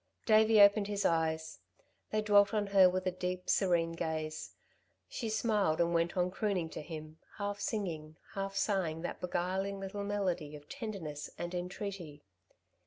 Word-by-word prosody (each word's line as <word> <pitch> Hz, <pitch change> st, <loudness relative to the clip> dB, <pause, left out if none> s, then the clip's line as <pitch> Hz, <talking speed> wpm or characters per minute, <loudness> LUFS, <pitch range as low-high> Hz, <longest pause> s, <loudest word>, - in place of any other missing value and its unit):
Davey 220 Hz, 0 st, +5 dB
opened 200 Hz, 0 st, +7 dB
his 205 Hz, -1 st, -2 dB
eyes. 160 Hz, -1 st, 0 dB, 0.5 s
They 215 Hz, 0 st, 0 dB
dwelt 205 Hz, 0 st, +5 dB
on 210 Hz, -1 st, +1 dB
her 195 Hz, -2 st, +6 dB
with 185 Hz, +1 st, -2 dB
a 185 Hz, -, +1 dB
deep, 180 Hz, 0 st, -4 dB
serene 175 Hz, -4 st, +2 dB
gaze. 155 Hz, -1 st, -4 dB, 0.5 s
She 230 Hz, -, -4 dB
smiled 210 Hz, -7 st, +1 dB
and 170 Hz, 0 st, +2 dB
went 170 Hz, +2 st, +1 dB
on 180 Hz, 0 st, +1 dB
crooning 190 Hz, -5 st, -1 dB
to -, -, -6 dB
him, 155 Hz, 0 st, -8 dB, 0.2 s
half 205 Hz, -1 st, -3 dB
singing, 165 Hz, -7 st, -3 dB, 0.2 s
half 195 Hz, 0 st, -3 dB
sighing 185 Hz, -5 st, 0 dB
that -, -, -5 dB
beguiling 190 Hz, +3 st, -2 dB
little 195 Hz, +1 st, -5 dB
melody 185 Hz, -7 st, -2 dB
of 145 Hz, 0 st, -12 dB
tenderness 195 Hz, -, -6 dB
and 175 Hz, +1 st, -4 dB
entreaty. 180 Hz, -4 st, -5 dB
185 Hz, 155 wpm, -33 LUFS, 165-205 Hz, 0.5 s, opened